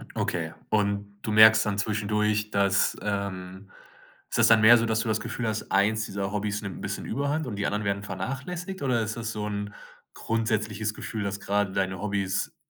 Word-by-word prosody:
Okay. 80 -2 -2 0.2
Und 100 -1 -1
du 110 - -3
merkst 110 +1 +7
dann 105 -1 -1
zwischendurch, 105 0 0
dass, 100 -1 +2
ähm 100 -1 -4 0.6
ist - - -2
das - - +6
dann 115 -1 +6
mehr 115 +2 +8
so, 115 - +1
dass 110 -1 +1
du 115 - -3
das 110 -1 +1
Gefühl 120 - -4
hast, 110 -1 -3
eins 110 +3 +2
dieser 100 -1 -3
Hobbys 105 0 -2
nimmt 100 -3 -6
'n - - -10
bisschen - - -4
Überhand 140 +4 -1
und 105 -5 -5
die 100 - -1
anderen 105 +1 -1
werden 100 -1 -1
vernachlässigt 135 - -5
oder 125 -4 +1
ist 110 +1 -3
das 115 -1 -4
so 105 -1 -3
'n 105 0 -4 0.4
grundsätzliches 110 -1 -1
Gefühl, 110 -1 -5
dass 100 0 -4
gerade 100 -1 0
deine 95 -1 -1
Hobbys, 100 -2 -1
105 Hz, 195 wpm, -27 LUFS, 100-110 Hz, 0.6 s, mehr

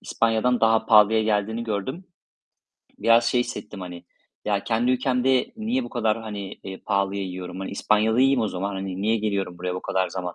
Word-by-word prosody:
İspanya'dan 115 +2 +1
daha 115 0 +3
pahalıya 110 0 +6
geldiğini 110 +2 -1
gördüm. 115 - -4 0.9
Biraz 115 0 +4
şey 120 +1 +2
hissettim 105 -4 -6
hani, 90 -1 -8 0.4
"Ya 100 -1 -1
kendi 120 +2 +1
ülkemde 130 - +1
niye 240 +4 -1
bu - - -8
kadar, 115 -2 0
hani, 100 -3 -6
eee, 95 -1 -7
pahalıya 100 0 -1
yiyorum? 95 0 -6
Hani, 95 - -5
İspanya'da 110 +3 +1
yiyeyim 135 -2 +4
o 110 - 0
zaman. 100 +2 -3
Hani 95 0 -4
niye 110 +2 +2
geliyorum 100 -4 -2
buraya 90 0 -3
bu 90 - -5
kadar 95 0 0
zaman? 90 -2 -5
110 Hz, 180 wpm, -24 LUFS, 95-115 Hz, 0.9 s, pahalıya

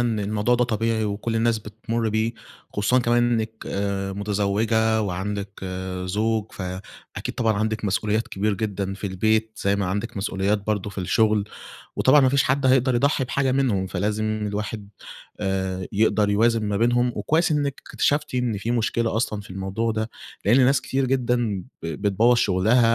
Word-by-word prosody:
إن 115 -3 0
الموضوع 105 +4 +1
ده 125 0 +2
طبيعي 115 -1 0
وكل 105 +3 -2
الناس 115 0 +2
بتمر 110 +2 -3
بيه، 110 +2 0 0.4
خصوصًا 105 +5 +2
كمان 120 0 +2
إنِك 110 -1 0
آآ 100 -1 -2
متزوجة 105 +2 +1
وعندِك 100 +1 -4 0.4
زوج، 110 +3 -1
فأكيد 95 0 -7
طبعًا 115 -2 +2
عندِك 110 +1 -1
مسؤوليات 105 +2 0
كبير 100 +1 0
جدًا 100 -1 -3
في 100 +1 -5
البيت، 110 +4 +1
زي 100 0 +3
ما 100 - -1
عندِك 100 +3 -3
مسؤوليات 100 +1 -1
برضه 105 -1 -1
في 100 - -9
الشغل، 105 +3 +2 0.5
وطبعًا 145 +3 +5
ما 130 - +5
فيش 140 +1 +3
حد 135 +1 +1
هيقدر 130 0 +4
يضحي 140 +3 +2
بحاجة 135 +1 0
منهم، 120 -8 +1
فلازم 105 +4 -1 0.2
الواحد 105 0 -4 0.5
آآ 95 -2 -2
يقدر 105 0 +2
يوازن 115 +2 +3
ما 105 -1 -1
بينهم، 120 +2 +2
وكويس 160 +10 +1
إنِك 145 -2 -1
اكتشفتِ 145 -2 +1
إن 125 -4 0
في 115 +4 -3
مشكلة 115 -1 0
أصلًا 110 -2 -1
في 100 - -13
الموضوع 95 +5 -2
ده، 110 +1 -2 0.3
لأن 125 +6 +5
ناس 130 0 +3
كتير 135 +1 -1
جدًا 120 -6 0 0.2
ب - - -4
بتبوَّظ 100 +8 +2
شغلها 115 +4 +3
110 Hz, 160 wpm, -24 LUFS, 100-120 Hz, 0.5 s, وطبعًا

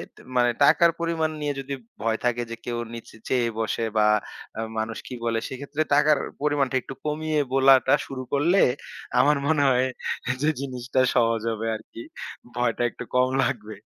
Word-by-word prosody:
তে - - -16 0.2
মানে 120 0 +4
টাকার 170 +4 +6
পরিমাণ 165 -2 0
নিয়ে 145 -1 -1
যদি 135 +1 -5 0.3
ভয় 115 0 +1
থাকে 120 0 +1
যে, 115 - -4
কেউ 120 -1 -2 0.2
নিচে 115 -1 -10
চেয়ে 120 -3 +1
বসে 115 +1 -1
বা 105 - +5 0.5
অ্যা 110 - -3 0.2
মানুষ 110 +1 -3
কি - - -7
বলে, 115 -1 +1
সেইক্ষেত্রে 140 +3 -4
টাকার 150 0 +5 0.2
পরিমাণটা 145 -3 +1
একটু 135 - -8
কমিয়ে 155 0 0
বলাটা 135 -1 +5
শুরু 130 -1 -6
করলে 170 +7 +3 0.6
আমার 145 +3 +5
মনে 155 -2 +3
হয় 130 0 +3 0.5
যে, 150 - +3
জিনিসটা 130 -1 -2 0.2
সহজ 115 -2 +3
হবে 110 0 -4
আরকি। 110 +1 -10 0.5
ভয়টা 120 0 0
একটু 125 - -8
কম 125 0 +4
লাগবে। 110 -4 -3
130 Hz, 165 wpm, -25 LUFS, 115-145 Hz, 0.6 s, টাকার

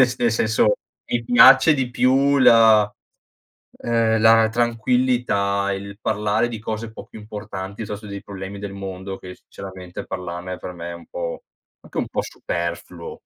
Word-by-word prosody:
nel 130 - +6
sen 125 - -5
nel 120 -2 +2
senso, 110 -2 +2 0.3
mi 120 -1 -1
piace 130 +5 +7
di 135 -3 -1
più 135 +3 +3
la 110 -4 +6 0.9
ehm, 115 -1 +1
la 110 0 +6
tranquillità, 120 -4 +1
il 100 +1 -7
parlare 105 +2 0
di 115 - -6
cose 110 +1 -5
po' 110 - -11
più 110 - -12
importanti, 105 -2 -7
piuttosto 105 0 -7
dei 100 0 -6
problemi 100 0 -7
del 100 -1 -6
mondo 95 0 -6
che, 90 0 -10
sinceramente, 95 -2 -10
parlarne 90 0 -5
per 90 - -7
me 85 0 -7
è - - -6
un 85 - -12
po' 85 -1 -5 0.4
anche - - -8
un - - -1
po' - - -2
superfluo 85 0 -6
105 Hz, 165 wpm, -22 LUFS, 95-115 Hz, 0.9 s, piace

